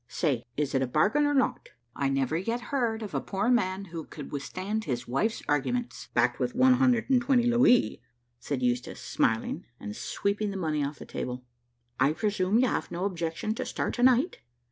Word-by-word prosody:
Say, 125 -7 -1
is 145 -2 -1
it 135 - +2
a 130 - +1
bargain 210 - +3
or 290 - +1
not?" 265 - 0 0.3
"I 140 - 0
never 135 +1 0
yet 230 +8 -1
heard 230 -4 0
of 205 - -7
a - - 0
poor 200 +5 0
man 195 -5 +1
who 165 -3 -6
could 150 - -9
withstand 190 +9 -3
his 125 -4 -3
wife's 215 - 0
arguments, 235 - -1
backed - - +2
with 245 - -1
one 255 0 +6
hundred 250 -2 +3
and 255 -2 +5
twenty 245 0 +3
louis," 240 - +4 0.4
said 130 +1 -3
Eustache 125 0 -1
smiling, 110 0 0 0.2
and 105 0 -6
sweeping 205 +1 -1
the 195 - -4
money 155 -5 0
off 140 +1 -3
the - - -9
table. 125 0 -5 0.6
"I 140 +4 +4
presume 200 +2 +1
you 255 +2 +4
have - - -2
no 175 +3 -3
objection 170 +2 -2
to 255 - -3
start 250 - -2
to 245 - -3
night? 260 +7 +4
195 Hz, 195 wpm, -28 LUFS, 145-240 Hz, 0.6 s, one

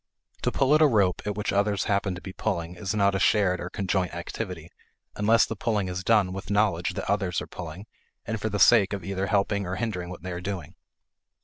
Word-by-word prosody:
To - - 0
pull 135 +1 +2
at 155 - +5
a 155 - +8
rope 100 -8 +2
at 105 - -1
which 105 0 -2
others 100 -1 +1
happen 100 -2 0
to 90 - -9
be 95 - -8
pulling 85 -6 -2
is 95 +4 -4
not 100 -1 +3
a 95 - 0
shared 95 -4 +3
or 90 - -5
conjoint 95 -3 -1
activity, 85 -1 -6 0.4
unless 110 +2 +4
the 115 - -5
pulling 105 -3 -1
is 90 +1 -4
done 100 -3 +3
with 95 0 -7
knowledge 100 -4 +1
that - - -4
others 95 -4 0
are - - -5
pulling 90 +3 -8 0.4
and 110 -1 -3
for 110 - -1
the 105 - -2
sake 105 -2 +5
of 100 -3 -4
either 95 0 -2
helping 100 -1 +1
or 90 - -2
hindering 90 -4 -3
what 90 -2 -9
they 90 - -5
are 90 0 -5
doing. 90 -5 -5
100 Hz, 225 wpm, -26 LUFS, 90-105 Hz, 0.4 s, a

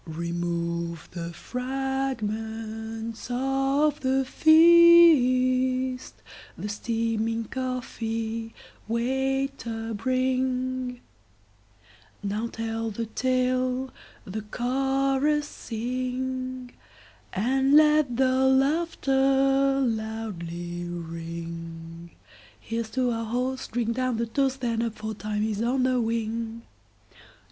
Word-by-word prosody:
Remove 170 0 -3
the 170 -1 -5
fragments 225 -2 -4
of 270 +4 +1
the 265 0 +1
feast! 260 -6 +5 0.4
The 210 - -5
steaming 225 +1 -1
coffee, 230 -3 -4 0.3
waiter, 250 -1 -1
bringNow 255 +1 -1 1.5
tell 225 0 -3
the 230 +2 -4
tale, 255 0 0 0.3
the 210 +3 -5
chorus 270 +5 0
sing, 255 +2 -4 0.6
And 265 +7 +2
let 300 -5 +5
the 260 0 +3
laughter 270 -1 +2
loudly 180 -7 -4
ring; 165 0 -7 0.5
Here 230 +1 -3
's 220 - -11
to 250 +1 0
our 230 0 -2
host, 250 +3 -3
drink 230 0 -1
down 255 -2 0
the 235 - 0
toast, 270 +3 0
Then 230 -2 0
up! 230 -2 -2
for 220 +1 -5
time 210 0 -3
is 215 -1 -1
on 250 +2 +1
the 255 -1 +2
wing. 230 0 -2
245 Hz, 85 wpm, -26 LUFS, 220-265 Hz, 1.5 s, feast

